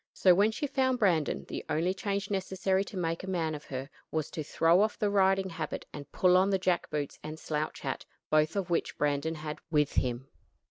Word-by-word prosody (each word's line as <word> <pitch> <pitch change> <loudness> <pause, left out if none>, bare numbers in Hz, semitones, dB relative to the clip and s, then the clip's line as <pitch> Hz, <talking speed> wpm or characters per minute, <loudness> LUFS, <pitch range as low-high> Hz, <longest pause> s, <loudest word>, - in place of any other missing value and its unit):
So 185 - +6
when 200 +4 +4
she 255 +7 -3
found 260 -2 +1
Brandon, 175 -10 +1
the - - -5
only 170 +4 +1
change 200 0 -3
necessary 190 0 0
to 200 - -8
make 165 -1 -1
a 190 - -5
man 165 -4 0
of 150 -1 -7
her 130 0 -5 0.2
was 155 -2 -2
to 155 - -4
throw 165 +5 +3
off 215 0 +1
the 205 -1 +1
riding 195 -1 +3
habit 160 -2 -4
and 145 -1 -9
pull 180 -1 +4
on 190 +2 +4
the 195 - +3
jack 180 -2 0
boots 150 -2 -3
and 155 +1 -6
slouch 155 -1 -3
hat, - - -3 0.3
both 155 +2 +3
of 190 -3 -2
which 170 - 0
Brandon 150 +2 0
had 150 -1 -6
with 150 -3 +2
him. 125 +1 -1
175 Hz, 215 wpm, -30 LUFS, 155-195 Hz, 0.3 s, So